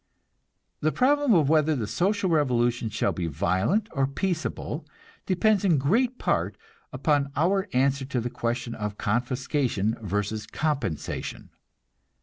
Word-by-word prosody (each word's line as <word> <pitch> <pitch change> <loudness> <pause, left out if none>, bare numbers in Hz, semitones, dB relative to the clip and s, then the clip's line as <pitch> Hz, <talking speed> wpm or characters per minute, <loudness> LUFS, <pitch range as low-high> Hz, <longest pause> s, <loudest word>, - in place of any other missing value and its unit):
The 155 - +1
problem 280 - +3
of 155 -5 +4
whether 155 0 +3
the 115 -5 -2
social 190 - 0
revolution 120 -6 +1
shall 105 - 0
be 85 -2 -3
violent 95 - +1
or 135 -1 +1
peaceable 165 +3 -3 0.4
depends 200 +2 +2
in 175 -6 +4
great 230 - +1
part - - 0 0.3
upon 145 -2 +1
our 190 +5 +2
answer 135 +1 +1
to 130 -1 -2
the 120 +1 -3
question 120 -1 -2
of 105 -2 -4
confiscation 120 0 0
versus 105 +1 -2
compensation. 145 - -3
135 Hz, 130 wpm, -26 LUFS, 115-175 Hz, 0.4 s, of